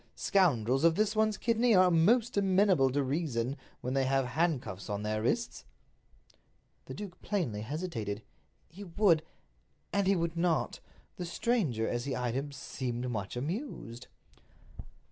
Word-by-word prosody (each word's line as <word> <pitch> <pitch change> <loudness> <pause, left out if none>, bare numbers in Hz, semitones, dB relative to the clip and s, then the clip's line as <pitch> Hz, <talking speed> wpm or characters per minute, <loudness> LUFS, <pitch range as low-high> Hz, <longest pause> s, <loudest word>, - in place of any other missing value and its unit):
Scoundrels 135 - +2
of 165 -1 +5
this 215 +2 +1
one's 215 -1 +2
kidney 230 -1 +2
are 185 -1 +6
most 225 +9 +3
amenable 190 -7 +4
to 140 +2 0
reason 135 -3 -1 0.3
when 125 - -3
they 135 -1 +2
have 135 0 +2
handcuffs 135 - -1
on 105 0 -3
their 110 0 -1
wrists." 235 - -1 1.2
The - - -8
duke 200 -4 -8
plainly 145 - -2
hesitated. 115 - -4 0.4
He 190 +6 -11
would—and 165 - -1
he 195 - +4
would 170 -1 -1
not. 170 -1 0 0.4
The 180 - -4
stranger, 170 - 0
as 120 +1 -2
he 135 -2 -2
eyed 125 -2 -1
him, 140 +3 -3
seemed 125 -3 -4
much 105 0 -4
amused. 145 - -5
155 Hz, 140 wpm, -31 LUFS, 120-190 Hz, 1.2 s, are